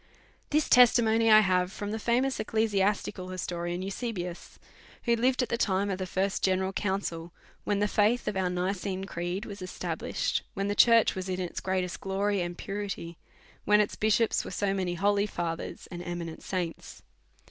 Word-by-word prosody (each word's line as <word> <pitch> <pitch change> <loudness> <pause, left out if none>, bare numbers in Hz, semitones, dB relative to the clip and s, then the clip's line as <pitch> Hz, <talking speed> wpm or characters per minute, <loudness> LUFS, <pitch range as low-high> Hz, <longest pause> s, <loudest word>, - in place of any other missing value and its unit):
This 300 0 +2
testimony 230 -2 +5
I 215 0 +9
have 185 -2 +1
from 205 +1 -5
the 220 - -3
famous 250 +4 +1
ecclesiasti 210 -2 +1
cal 185 -2 -8
historian 175 -1 -3
Eusebius, 195 -4 -5 0.5
who 235 -1 +3
lived 250 +2 +2
at - - -4
the 235 - -1
time 195 0 +1
of 190 - -3
the 185 - -3
first 190 +2 -1
general 190 0 +1
council, 190 -4 -2 0.3
when 205 - +1
the 205 +1 +2
faith 215 +4 +2
of 210 - -1
our 190 -1 0
Nicene 185 +1 -2
creed 175 +1 -4
was 200 -1 -8
established, 185 - -2
when 195 0 -1
the - - +1
church 230 +1 +5
was 190 0 -5
in 185 0 -2
its 180 -2 -3
greatest 185 -3 -2
glory 195 0 0
and 175 0 -4
purity, 195 -4 -5 0.4
when 210 0 +4
its 210 - +1
bishops 220 +1 +2
were - - -7
so 200 -1 -1
many 185 -2 -1
holy 200 +3 +2
fathers 170 -4 -4
and 175 -1 -6
eminent 175 -2 -5
saints. 175 -3 -5
195 Hz, 175 wpm, -29 LUFS, 180-210 Hz, 0.5 s, I